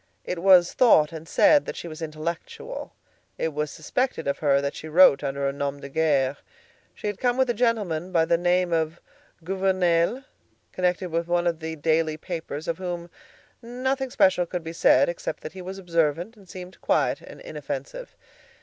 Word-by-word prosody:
It 180 Hz, -, -3 dB
was 180 Hz, -1 st, +6 dB
thought 155 Hz, -12 st, +5 dB
and 160 Hz, 0 st, -9 dB
said 295 Hz, -2 st, +5 dB
that -, -, -4 dB
she -, -, -7 dB
was 155 Hz, 0 st, -9 dB
intellectual; 160 Hz, +1 st, -6 dB, 0.4 s
it 160 Hz, -, -2 dB
was 150 Hz, 0 st, -2 dB
suspected 255 Hz, -, -2 dB
of 140 Hz, -, -1 dB
her 140 Hz, -2 st, +3 dB
that 140 Hz, 0 st, -2 dB
she 160 Hz, -, -8 dB
wrote 155 Hz, -3 st, +6 dB
under 140 Hz, 0 st, -1 dB
a 140 Hz, -, -1 dB
nom 140 Hz, 0 st, -3 dB
de 140 Hz, -, -9 dB
guerre. 140 Hz, -3 st, +1 dB, 0.6 s
She -, -, -10 dB
had 205 Hz, -1 st, -2 dB
come 245 Hz, -1 st, +1 dB
with 260 Hz, -2 st, +3 dB
a -, -, -2 dB
gentleman 205 Hz, -8 st, 0 dB
by 165 Hz, -2 st, +3 dB
the 170 Hz, -, +3 dB
name 175 Hz, 0 st, +1 dB
of 160 Hz, 0 st, -1 dB, 0.4 s
Gouvernail, 185 Hz, +4 st, +1 dB, 0.5 s
connected 180 Hz, 0 st, -1 dB
with 165 Hz, +1 st, -1 dB
one 175 Hz, 0 st, +1 dB
of 170 Hz, -2 st, 0 dB
the 160 Hz, 0 st, -5 dB
daily 160 Hz, 0 st, +1 dB
papers, 160 Hz, -3 st, -6 dB
of 165 Hz, 0 st, -2 dB
whom 175 Hz, -2 st, -5 dB, 0.5 s
nothing 260 Hz, +3 st, -2 dB
special 185 Hz, -8 st, +3 dB
could 175 Hz, -1 st, -4 dB
be 165 Hz, 0 st, -6 dB
said, 140 Hz, -4 st, +4 dB
except 170 Hz, -, -4 dB
that -, -, -7 dB
he 190 Hz, -, -8 dB
was 190 Hz, +2 st, -7 dB
observant 170 Hz, +2 st, -1 dB
and 195 Hz, -4 st, -19 dB
seemed 185 Hz, 0 st, -10 dB
quiet -, -, +1 dB
and -, -, -12 dB
inoffensive. -, -, -7 dB
170 Hz, 185 wpm, -25 LUFS, 155-190 Hz, 0.6 s, was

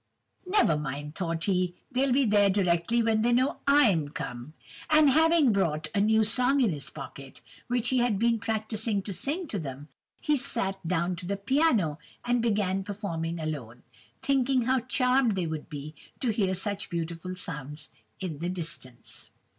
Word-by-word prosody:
"Never 375 Hz, -, +3 dB
mind, 145 Hz, +1 st, -5 dB
thought 165 Hz, -3 st, -3 dB
he, 180 Hz, -2 st, 0 dB, 0.2 s
they'll 265 Hz, +1 st, +1 dB
be 265 Hz, 0 st, +3 dB
here 205 Hz, -1 st, +4 dB
directly 190 Hz, +4 st, +2 dB
when 220 Hz, -1 st, +2 dB
they 240 Hz, +2 st, +2 dB
know 255 Hz, +3 st, +2 dB
I'm 210 Hz, -, +4 dB
come! 125 Hz, -1 st, -7 dB, 0.4 s
And 305 Hz, -2 st, +6 dB
having 320 Hz, -2 st, +4 dB
brought 155 Hz, -6 st, 0 dB
a 200 Hz, -, +2 dB
new 220 Hz, +1 st, +4 dB
song 250 Hz, +6 st, +3 dB
in 235 Hz, -7 st, +3 dB
his 145 Hz, -4 st, -2 dB
pocket, 135 Hz, 0 st, -10 dB, 0.3 s
which 245 Hz, -1 st, 0 dB
he 260 Hz, -, +2 dB
had 240 Hz, -4 st, +2 dB
been 230 Hz, +2 st, +2 dB
practising 220 Hz, -2 st, -1 dB
to 200 Hz, -, -5 dB
sing 310 Hz, -, -1 dB
to 205 Hz, -, -2 dB
them, 140 Hz, -1 st, -7 dB, 0.3 s
he 300 Hz, -1 st, +1 dB
sat 195 Hz, -7 st, -1 dB
down 175 Hz, +1 st, 0 dB
to 175 Hz, 0 st, -7 dB
the 200 Hz, +1 st, -1 dB
piano, 205 Hz, -, +2 dB, 0.3 s
and 245 Hz, -1 st, +2 dB
began 200 Hz, -4 st, 0 dB
performing 170 Hz, -5 st, -4 dB
alone, 140 Hz, -7 st, -5 dB, 0.4 s
thinking 265 Hz, -2 st, +2 dB
how 260 Hz, +2 st, +2 dB
charmed 250 Hz, -2 st, +2 dB
they 185 Hz, -2 st, -1 dB
would 160 Hz, -2 st, -5 dB
be 150 Hz, +1 st, -7 dB, 0.3 s
to 245 Hz, -, +1 dB
hear 195 Hz, -3 st, 0 dB
such 200 Hz, +2 st, -2 dB
beautiful 170 Hz, +2 st, -4 dB
sounds 150 Hz, -4 st, -4 dB, 0.3 s
in 170 Hz, -7 st, -5 dB
the 175 Hz, +2 st, -2 dB
distance! 155 Hz, -9 st, -4 dB
200 Hz, 170 wpm, -28 LUFS, 165-245 Hz, 0.4 s, And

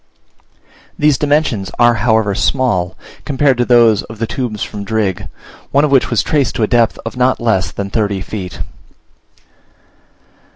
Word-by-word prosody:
These 150 Hz, -2 st, +2 dB
dimensions 145 Hz, -9 st, 0 dB
are 120 Hz, 0 st, +5 dB
however 110 Hz, -2 st, +1 dB
small, 105 Hz, -6 st, 0 dB, 0.3 s
compared 135 Hz, -2 st, +1 dB
to 120 Hz, -, +2 dB
those 115 Hz, -4 st, +4 dB
of 110 Hz, -, -11 dB
the 115 Hz, -, -1 dB
tubes 115 Hz, -3 st, -4 dB
from 105 Hz, -1 st, -6 dB
Drigg, 100 Hz, -2 st, -2 dB, 0.4 s
one 140 Hz, +2 st, +3 dB
of 150 Hz, -, -2 dB
which 135 Hz, -2 st, +3 dB
was 120 Hz, -, +1 dB
traced 145 Hz, -4 st, 0 dB
to 115 Hz, -, 0 dB
a -, -, +2 dB
depth 115 Hz, -1 st, +2 dB
of 115 Hz, -, -5 dB
not 125 Hz, +1 st, +2 dB
less 95 Hz, -7 st, 0 dB
than 100 Hz, -1 st, -5 dB
thirty 100 Hz, -3 st, -1 dB
feet. 95 Hz, -2 st, -6 dB
115 Hz, 155 wpm, -15 LUFS, 100-130 Hz, 0.4 s, are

